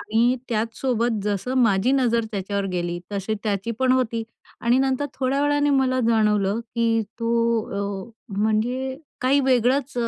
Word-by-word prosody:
आणि 235 +4 +2
त्याचसोबत, 230 0 -1
जसं 210 +5 -1
माझी 220 +2 +3
नजर 235 -4 +2
त्याच्यावर 200 0 -2
गेली, 175 -1 -2
तशी 200 +2 -2
त्याची 205 +1 -1
पण 260 -1 +4
होती. 235 -3 0 0.4
आणि 240 +2 +3
नंतर 270 +1 +1
थोड्या 270 +2 0
वेळाने 290 0 +2
मला 260 -2 +2
जाणवलं 210 -2 +2
की 230 -1 +2 0.2
तो 225 -4 -1
अ, - - -16 0.3
म्हणजे 245 +5 0 0.2
काही 265 +3 +3
वेगळंच 260 +2 +2
230 Hz, 135 wpm, -23 LUFS, 210-260 Hz, 0.4 s, पण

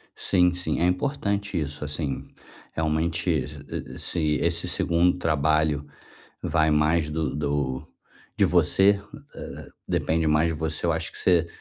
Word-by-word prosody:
Sim, 90 -2 +3
sim. 90 -4 -2
É 85 - +3
importante 100 - 0
isso, 75 -1 -4
assim, 75 -2 -3 0.5
realmente, 80 +2 0
e 70 -1 -4
e - - -9
se 85 - -2 0.2
esse 85 0 0
2º 85 +2 +2
trabalho 75 -2 +1 0.6
vai 80 -1 +2
mais 75 +1 +2
do 75 -2 -2
do 70 -3 -1 0.5
de - - +4
você 100 +1 +4 0.4
eh, - - -8 0.2
depende 80 0 0
mais 75 +2 +3
de 80 - -1
você, 80 +1 -2
eu 85 - +3
acho 80 -1 -2
que - - -8
você 85 -2 +3
80 Hz, 145 wpm, -25 LUFS, 75-85 Hz, 0.6 s, de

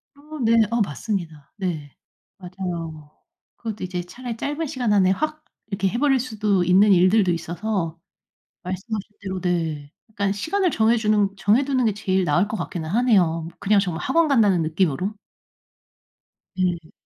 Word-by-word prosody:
어 300 +2 -10
네. 225 - +4 0.2
어 235 0 +1
맞습니다. 160 -5 -4
네. 165 -8 -4 0.4
맞아요. 175 -5 -6 0.5
그것도 220 -4 -5
이제 180 -1 -3
차라리 240 +6 -7
짧은 295 +6 -3
시간 250 -6 -1
안에 190 -2 +4
확 305 +8 -2 0.2
이렇게 195 -2 0
해 235 - -3
버릴 270 -1 +3
수도 210 -6 0
있는 195 +4 +5
일들도 185 +2 +4
있어서 170 0 -3 0.6
말씀하신 195 +4 -4
대로 190 -2 -4
네 160 -5 -2 0.2
그러니깐 200 -2 -1
시간을 360 - 0
정해 225 -3 +3
주는 210 -2 +2
정해 215 +8 +3
두는 260 -3 +1
게 215 - +1
제일 190 -2 0
나을 175 +5 +2
것 220 - -3
같기는 165 -6 -5
하네요. 180 -7 +2
그냥 205 0 +3
정말 175 -4 -3
학원 325 +4 +2
간다는 210 - +4
느낌으로. 175 +4 0 1.4
음. 175 -3 -1
195 Hz, 315 characters per minute, -23 LUFS, 175-225 Hz, 1.4 s, 있는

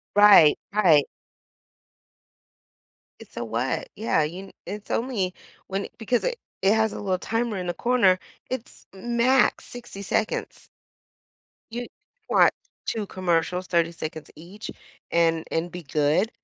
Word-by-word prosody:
Right. 205 -7 +8
Right. 170 -9 +5 2.2
It's - - -15
a 120 - -3
what? 115 +3 -2
Yeah. 215 -6 +1
You 175 +6 -4
n 195 - -14
it's 210 0 -7
only 215 -7 -1 0.3
when 195 +1 -2
i - - -8
because 235 +2 0
it - - -2 0.2
it 195 +2 +5
has 220 -1 +2
a - - -5
little 190 -2 0
timer 225 +1 -1
in 180 - -4
the 175 - -1
corner. 235 -7 +3 0.3
It's 255 -2 -7
max 240 +5 +2
60 240 -5 -10
seconds. 205 +2 -2 1.0
You 240 +1 -4 0.4
want - - +5 0.3
2 215 -2 -2
commercials, 180 -1 0
30 170 -1 +2
seconds 160 -2 -7
each, 180 +7 -9 0.4
and 165 -1 +2
and 165 +2 -1
be 180 -1 -8
good. 150 +9 +1
190 Hz, 135 wpm, -25 LUFS, 170-225 Hz, 2.2 s, Right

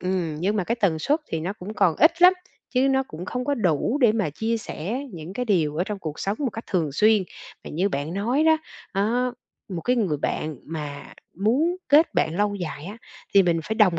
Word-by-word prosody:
ừm, 180 -4 -1
nhưng 205 +4 +1
mà 190 - 0
cái 235 - 0
tần 170 -6 +2
suất 295 - +1
thì 160 - -2
nó 180 +5 -2
cũng 210 +1 -8
còn 170 -6 +3
ít 330 +4 +4
lắm, 365 +1 +9 0.4
chứ 260 +2 +4
nó 265 0 +3
cũng 165 +3 -7
không 250 +5 -3
có 285 +1 +1
đủ 215 - +1
để 235 -4 +5
mà 210 -9 0
chia 225 +9 -1
sẻ 215 - -4
những 165 +2 -8
cái 250 +4 -2
điều 160 -9 +1
ở 175 - +1
trong 205 -1 -4
cuộc 155 -4 -6
sống 200 +2 -1
một 275 -4 -1
cách 225 - -7
thường 160 -7 0
xuyên. 215 +4 +4 0.4
Mà - - -7
như 180 +6 +1
bạn 150 +2 -3
nói 245 +10 +1
đó, 320 0 +6 0.4
á, 235 +6 +1 0.4
một 175 -4 -4
cái 250 0 +1
người 185 -10 +1
bạn 155 +1 -2
mà 150 -3 -6 0.2
muốn 270 - +2
kết 305 +3 +5
bạn 160 +1 +1
lâu 205 0 +1
dài 165 -5 -5
á, 205 +3 -7 0.4
thì 195 - +8
mình 170 -2 +1
phải 220 - -2
đồng 185 -7 +4
200 Hz, 230 wpm, -24 LUFS, 165-240 Hz, 0.4 s, lắm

